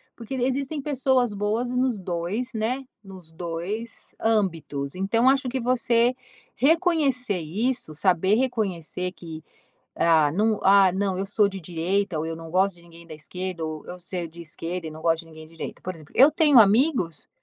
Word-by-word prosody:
porque 235 +3 -6
existem 265 +3 -1
pessoas 260 -4 +1
boas 215 +4 -1
nos 250 -2 +1
2, 185 +8 -3
né, 240 +5 -2 0.2
nos 185 -4 -12
2 175 +7 -6
âmbitos. 165 -10 -1
Então 225 +7 +2
acho 270 -1 +2
que 260 +2 -2
você 240 0 +2 0.4
reconhecer 280 - +2
isso, 210 +3 -2
saber 185 +4 +2
reconhecer 190 -8 -2
que, 160 -4 -9 0.6
ah, 160 -3 +4
hum, 215 +2 +2
ah, 195 -1 +6
não, 190 0 -1
eu 195 - -2
sou 205 +1 +3
de 195 -1 -7
direita, 180 +2 -1
ou 155 - -2
eu 165 - -3
não 165 0 -10
gosto 190 +1 +2
de 170 - -19
ninguém 170 0 -15
da 160 - -9
esquerda 180 +3 -6
ou 155 -1 -5
eu 180 - -8
sou 175 0 -5
de 165 +2 -13
esquerda 170 +1 -5
e - - -7
não 155 +1 -10
gosto 165 -1 +2
de 165 - -16
ninguém 160 -1 -12
de - - -21
direita. - - -7
Por 185 - -4
exemplo, 155 -2 -16
eu 275 +4 +8
tenho 295 -4 +5
amigos, 220 - +3
195 Hz, 180 wpm, -25 LUFS, 170-245 Hz, 0.6 s, eu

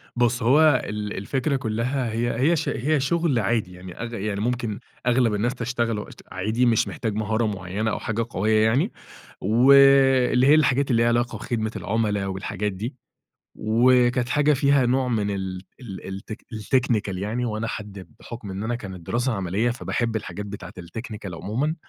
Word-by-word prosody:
بُص 120 0 +1
هو 145 +2 +5
ال 105 - -5 0.2
ال - - -7
الفكرة 135 +8 -1
كُلّها 120 +1 -1
هي 115 +1 -1
هي 155 +7 +4
ش 155 - -1
هي 145 +6 0
شغل 145 -1 +1
عادي، 110 -3 0
يعني 90 0 -10
أغ 120 0 -5
يعني 100 -1 -3
ممكن 120 -2 -2 0.3
أغلب 120 -2 +3
الناس 120 +5 0
تشتغله 115 -3 -2 0.3
عادي 110 +7 0
مش 115 -2 +3
محتاج 110 -4 -3
مهارة 110 +2 0
معَيَّنة 100 +1 -2
أو - - -2
حاجة 115 +1 -2
قوية 110 0 +2
يعني، 135 - +2 0.5
و 120 +7 +4
اللي 135 -2 +6
هي 150 - +7
الحاجات 140 -3 +2
اللي 115 -1 +3
ليها 115 - +3
علاقة 120 +1 0
بخدمة 110 -2 -2
العملاء 105 -1 -1
والحاجات 100 +2 -3
دي. 110 +8 -5 0.6
وكانت 120 +2 +3
حاجة 150 +2 +3
فيها 140 -2 +3
نوع 130 +1 +1
من 105 -4 0
ال 95 -2 -4 0.2
ال 105 -7 -8
الت 95 +3 -7 0.2
الTechnical 110 -3 0
يعني 110 +6 -2
وأنا 110 -1 -2
حد 105 -4 -7
بحُكم 115 -4 -8
إن 95 +1 -5
أنا 120 +2 -1
كانت 95 -7 -8
دراسة 120 +2 0
عملية 100 +3 0
فباحب 120 -1 -2
الحاجات 105 -1 -5
بتاعت 100 -2 -8
الTechnical 100 +1 -7
عُمومًا، 120 - -2
115 Hz, 170 wpm, -24 LUFS, 105-125 Hz, 0.6 s, هي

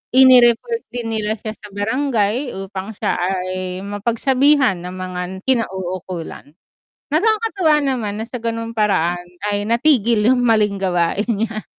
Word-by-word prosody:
ini-report 260 - +5
din 240 -2 -5
nila 215 +1 -2
siya 215 +1 -6
sa 210 - -12
barangay 225 +3 -1
upang 195 +2 -7
siya - - -1
ay 185 0 -2
mapagsabihan 250 +3 +2
ng 180 +1 -7
mga 185 -1 -5 0.2
kinauukulan. 185 - -3 0.6
Nakakatuwa 395 -1 +2
naman 245 -7 -1
na - - -4
sa 250 - -5
ganung 230 0 -3
paraan 175 -4 +1 0.2
ay 205 0 -1
natigil 235 -2 +3
yung 245 -1 +3
maling 210 -3 +2
gawain 185 +1 0
niya. 220 -1 -2
220 Hz, 125 wpm, -19 LUFS, 190-250 Hz, 0.6 s, ini-report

